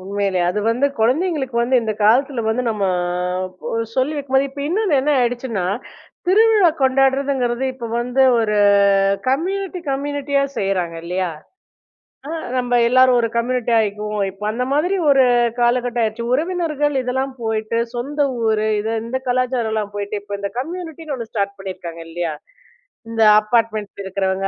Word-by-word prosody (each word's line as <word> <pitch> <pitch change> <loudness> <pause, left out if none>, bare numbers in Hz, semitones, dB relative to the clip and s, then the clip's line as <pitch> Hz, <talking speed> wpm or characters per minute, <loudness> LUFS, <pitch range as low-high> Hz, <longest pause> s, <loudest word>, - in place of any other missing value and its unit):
உண்மையிலே. 195 -1 -1
அது 210 +3 -2
வந்து 250 +5 +2
கொழந்தைங்களுக்கு 265 +1 0
வந்து 255 +2 +2
இந்த 220 -1 -1
காலத்துல 255 +3 +3
வந்து 240 +3 0
நம்ம 210 -2 -3 0.9
ஒ - - -5 0.2
சொல்லி 260 +4 +1
வைக்கும்போதே 275 -1 +1
இப்ப 280 +1 -8
இன்னொன்னு 385 -1 +1
என்ன 295 +3 0
ஆயிடுச்சுன்னா, 240 -5 -1 0.6
திருவிழா 420 -1 +5
கொண்டாடுறதுங்கிறது 265 -1 +1
இப்போ 240 -3 -6
வந்து 250 +2 +1 0.2
ஒரு 210 -2 0 0.7
கம்யூனிட்டி 370 +7 -1
கம்யூனிட்டியா 280 0 -1 0.2
செய்றாங்க 180 -4 -1
இல்லியா? 180 +1 -2 1.0
அ - - -6 0.3
நம்ப 245 -1 -1 0.2
எல்லாரும் 255 0 +5
ஒரு 230 - +1
கம்யூனிட்டியா 240 -1 +1
ஆய்க்குவோம், 210 0 -2
இப்போ 195 +2 -8
அந்த 240 +3 -2
மாதிரி 355 +7 +1
ஒரு 270 -2 +5 0.4
காலகட்டம் 240 0 +1
ஆயிருச்சு. 220 +1 -2
உறவினர்கள் 305 -2 0
இதெல்லாம் 265 +2 -2
போயிட்டு, 220 0 -2 0.2
சொந்த 285 +5 -2 0.2
ஊர் 220 -1 +2 0.2
இது, 220 +2 -2
இந்த 255 +3 -3
கலாச்சாரம்லாம் 235 -5 -1
போயிட்டு 205 0 -3
இப்போ, 205 - -8
இந்த 200 - -2
கம்யூனிட்டின்னு 325 -1 -5
ஒண்ணு 230 -2 -7
ஸ்டார்ட் 200 -2 -2
பண்ணீருக்காங்க 175 -3 -7
இல்லியா? 170 -1 -3 0.8
இந்த 225 -1 -1 0.2
அப்பார்ட்மெண்ட்ல 215 -2 -1
இருக்குறவங்க, 190 0 -1
245 Hz, 135 wpm, -20 LUFS, 210-275 Hz, 1.0 s, திருவிழா